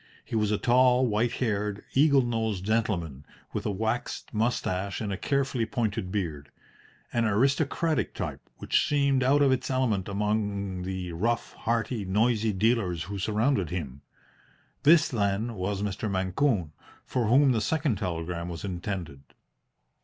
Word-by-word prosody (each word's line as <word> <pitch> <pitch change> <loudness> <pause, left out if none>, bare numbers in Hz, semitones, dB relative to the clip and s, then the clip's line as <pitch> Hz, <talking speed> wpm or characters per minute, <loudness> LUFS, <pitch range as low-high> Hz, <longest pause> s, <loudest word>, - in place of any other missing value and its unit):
He - - -5
was 105 -2 +2
a 105 - +1
tall, 125 +2 +4
white 115 +1 +1
haired, 105 -3 -2
eagle 140 -1 +5
nosed 110 -5 -1
gentleman, 95 -11 -1 0.3
with - - -2
a - - 0
waxed 110 +4 -3
moustache 100 -4 -1
and 105 -3 -3
a - - -1
carefully 135 0 0
pointed 110 -5 -2
beard 80 -8 -3 0.6
an 120 -1 +2
aristocratic 140 +7 +1
type - - -4 0.2
which - - +1
seemed 140 -2 +2
out 140 +3 +4
of 135 - +4
its 130 0 0
element 120 -8 0
among 100 -2 -1
the 90 -1 -4
rough, 115 +8 -1
hearty, 115 -1 -1
noisy 110 +3 +2
dealers 100 -4 +1
who 100 +3 -6
surrounded 105 - +1
him. 70 -6 -5 0.8
This, 155 0 +6
then, 105 0 -1
was 100 0 -2
Mr. 105 +2 -2
Mancune, 95 - 0 0.3
for 120 -4 -1
whom 135 +4 +5
the 115 -3 +1
second 140 - 0
telegram 85 -1 -3
was 85 -3 -6
intended. 90 -6 -5
105 Hz, 145 wpm, -27 LUFS, 95-120 Hz, 0.8 s, This